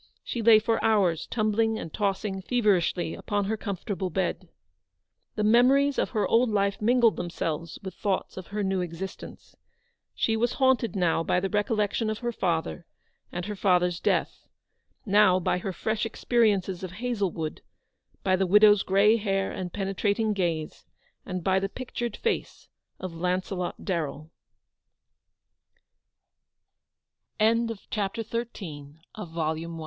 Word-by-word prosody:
She 235 - -3
lay 225 0 +7
for 225 +1 0
hours, 190 -7 +2
tumbling 220 0 +1
and 165 - -7
tossing 195 -1 -1
feverishly 190 -7 +1
upon 205 -2 -2
her 220 +3 -1
comfortable 200 -2 -4
bed. 190 +3 -2 0.9
The 215 - -1
memories 260 +6 +4
of - - 0
her 215 -3 0
old 235 +1 +3
life 200 -1 0
mingled 235 0 +4
them 175 - -3
selves 165 0 -4
with 190 -2 -6
thoughts 195 +1 -2
of 185 -2 -8
her 210 0 -3
new 190 -1 0
existence. 180 +2 -7 0.6
She 225 - +1
was 235 +2 +1
haunted 260 -4 +2
now 175 -3 +2
by 175 - +1
the 195 +1 -3
recollection 210 +1 0
of 215 - -2
her 240 0 -3
father, 170 -4 -2 0.4
and 175 0 -4
her 210 - -4
father's 180 -3 +2
death; - - -1 0.6
now 200 -3 +5
by 180 0 0
her 190 - -3
fresh 220 +4 -2
experiences 210 -5 +1
of 185 -1 -6
Hazlewood, 195 -8 -3 0.6
by 185 -1 +3
the 190 0 0
widow's 210 +1 +6
grey 200 +4 +4
hair 195 -3 -1
and 180 -1 -5
penetrating 205 +3 0
gaze, 170 -5 -2 0.4
and 185 -1 -4
by 190 +1 +3
the 195 0 -2
200 Hz, 120 wpm, -27 LUFS, 185-220 Hz, 0.9 s, lay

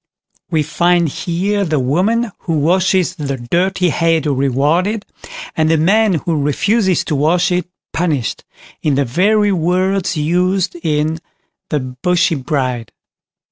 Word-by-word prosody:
We 160 -3 +1
find 175 +2 +2
here 190 +7 -1
the 160 -4 0
woman 195 - +1
who 165 -3 -2
washes 180 +3 +2
the 140 -5 -3
dirty 180 +8 0
head 165 0 +1
rewarded, 150 - +1 0.5
and 155 -1 +2
the 160 - +3
man 200 +5 +3
who 160 -1 -1
refuses 190 +6 +1
to 155 - -1
wash 170 +6 +2
it 180 0 0 0.3
punished, 155 -8 -1 0.4
in 150 -3 +1
the 140 0 +1
very 205 - +2
words 185 +1 0
used 180 +4 0
in 155 0 0 0.5
"The 150 -3 0
Bushy 165 +7 0
Bride". 130 -5 -2
170 Hz, 130 wpm, -16 LUFS, 150-185 Hz, 0.5 s, the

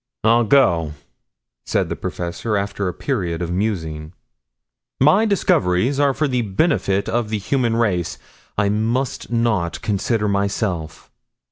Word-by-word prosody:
"I'll 115 +2 +4
go," 85 - +3 0.7
said - - +1
the - - -2
professor 90 +5 -3
after 100 0 -2
a 90 - -2
period 85 -1 -2
of 85 - -3
musing. 80 -5 -2 0.9
"My 175 - +5
discoveries 135 - +2
are 140 -2 +3
for 155 - +1
the 125 -2 0
benefit 100 - +1
of 120 -2 -1
the 110 - -1
human 115 +3 0
race, 100 -7 0 0.4
I 100 0 +2
must 115 +5 -1
not 110 -8 0
consider 105 +1 0
myself." 100 -4 -2
105 Hz, 130 wpm, -20 LUFS, 90-120 Hz, 0.9 s, My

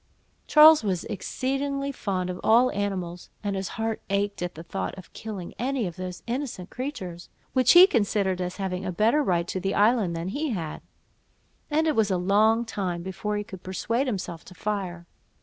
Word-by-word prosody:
Charles 305 -2 +8
was 185 -4 -1
exceedingly 275 +6 -2
fond 185 -8 -2
of 180 - -7
all 240 +3 +5
animals, 185 -4 -3
and 200 -1 -1
his 190 -1 -2
heart 225 0 -2
ached 200 0 -1
at 175 0 -3
the 165 - -8
thoughts 190 +2 -4
of 185 - -12
killing 205 -6 -7
any 255 -1 0
of 175 -2 -5
those 185 -1 -6
innocent 235 -7 -4
creatures, 190 -11 -6 0.2
which 255 -2 +5
he 355 +1 +11
considered 200 - +1
as 180 0 -4
having 190 -2 -3
a 190 - -2
better 225 - +3
right 175 -9 +1
to 185 - -2
the 195 +1 -1
island 210 -4 +3
than 165 +2 -3
he 295 +8 -2
had; 165 -6 -4 0.9
and 315 +1 +2
it 310 - +2
was 220 -2 +3
a 190 - +1
long 215 +5 +3
time 180 -6 -3
before 210 +3 -3
he 205 - -2
could 190 -3 -10
persuade 230 +8 -1
himself 180 -7 -4
to 185 - -13
fire. 185 -5 -3
200 Hz, 185 wpm, -26 LUFS, 180-235 Hz, 0.9 s, he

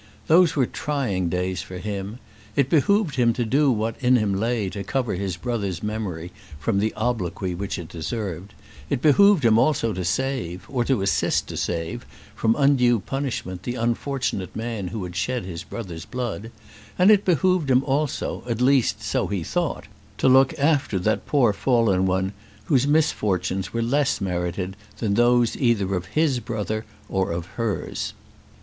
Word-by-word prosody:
Those 170 0 +5
were 135 -4 +3
trying 120 - -2
days 90 0 -1
for 90 - -8
him. 100 +3 -5 0.4
It 140 -2 +2
behoved 170 +1 +2
him 120 -2 +4
to 120 +1 -1
do 140 +4 +3
what 110 +1 -2
in 125 +1 +5
him 105 -4 +1
lay 110 +1 0
to 100 - -5
cover 125 +3 -1
his 95 -1 -3
brother's 100 -5 -3
memory 100 -6 -4 0.3
from 100 +6 0
the 110 +2 +1
obloquy 100 -6 -2
which 100 +4 -4
it 85 -3 -7
deserved; 95 +1 -5 0.3
it - - 0
behoved 165 +2 +5
him 110 -1 +5
also 115 -6 +2
to 90 -1 -3
save, 100 -3 -2
or 125 -3 0
to 130 -8 +1
assist 100 - +1
to - - -5
save, 85 -1 -3 0.3
from 115 0 +1
undue 130 -5 +4
punishment 115 -6 -4
the 120 +5 -4
unfortunate 120 -3 -2
man 110 -4 -3
who 105 +1 -4
had 90 -1 -7
shed 120 +4 -1
his 85 -2 -6
brother's 90 -8 -7
blood; 120 -3 -4 0.5
and 185 +3 +6
it 205 -1 +5
behoved 180 -3 +2
him 130 +1 +4
also, 140 +1 -1
at 115 -1 -1
least 130 0 +2
so - - 0
he 100 -4 -2
thought, - - -2 0.3
to - - +2
look 130 0 +5
after 140 -8 +2
that 105 +4 0
poor 125 -8 +3
fallen 105 -6 +2
one 95 +1 0 0.3
whose 140 -5 +2
misfortunes 95 - +1
were 115 0 -1
less 140 +4 +1
merited 90 0 -2 0.2
than 105 -4 0
those 120 +1 +3
either 110 -7 +1
of 90 -1 -2
his 155 -5 +1
brother 110 -2 -3 0.2
or 95 -2 -1
of 85 0 -3
hers. 110 +2 -3
115 Hz, 170 wpm, -24 LUFS, 95-130 Hz, 0.5 s, and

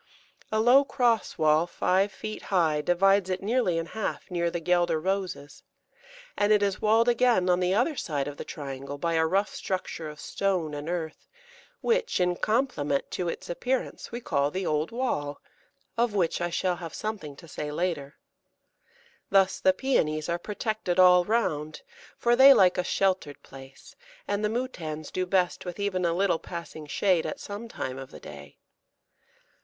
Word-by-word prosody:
A 220 - +1
low 245 +5 +6
cross 240 -6 0
wall, 155 +2 +3
five 190 +3 +1
feet 215 +2 -7
high, 160 -6 +2
divides 190 +3 +3
it 185 +1 -2
nearly 215 -5 +1
in 165 - -1
half 215 +1 -5
near 170 -1 0
the 170 - -3
Guelder 175 -1 +1
Roses, 185 -5 -3 0.7
and 205 +1 +2
it 210 -1 +4
is 200 -2 -1
walled 225 +2 +4
again 235 -7 +3
on 180 - +2
the 180 +1 +1
other 245 +9 +2
long 295 - -10
side 145 -4 -2
of 145 0 -7
the - - -5
triangle 140 -1 -7
by 165 +3 -1
a 160 0 +2
rough 195 +5 0
structure 180 -4 -4
of 150 0 -11
stone 185 -6 -1
and 145 +2 -5
earth, 165 -3 -4 0.5
which, 470 - +1
in 180 -1 +2
compliment 215 - 0
to 175 -2 -2
its - - -6
appearance, 250 +9 -3
we 235 - -4
call 140 -11 0
the 185 +4 -3
Old 155 0 0
Wall, 190 - -2 0.6
of 235 -3 +1
which 175 -3 +1
I 175 - 0
shall 180 +1 -1
have 165 -3 -7
something 200 -10 -5
to 165 +4 -14
say 150 -1 -5
later. 150 -3 -2 1.1
Thus 195 -1 +3
the 190 - +5
Pæonies 155 - 0
are 170 0 -1
protected 210 -2 -3
all 180 -1 +7
round, 155 -9 -1 0.3
for 240 0 +3
they 270 +2 +9
like 185 -1 +4
a - - +1
sheltered 185 -6 -1
place, 135 0 -14 0.3
and 205 +1 -1
the 210 - +2
Moutans 170 - -4
do 185 0 -2
best 180 -1 +1
with 180 +1 -7
even 190 -3 -1
a 170 - +2
little 180 -2 +1
passing 165 -3 -8
shade 175 +3 +1
at - - -5
some 205 +3 -7
time 130 - -5
of 135 -1 -8
the - - -12
day. - - -12
180 Hz, 175 wpm, -27 LUFS, 155-210 Hz, 1.1 s, they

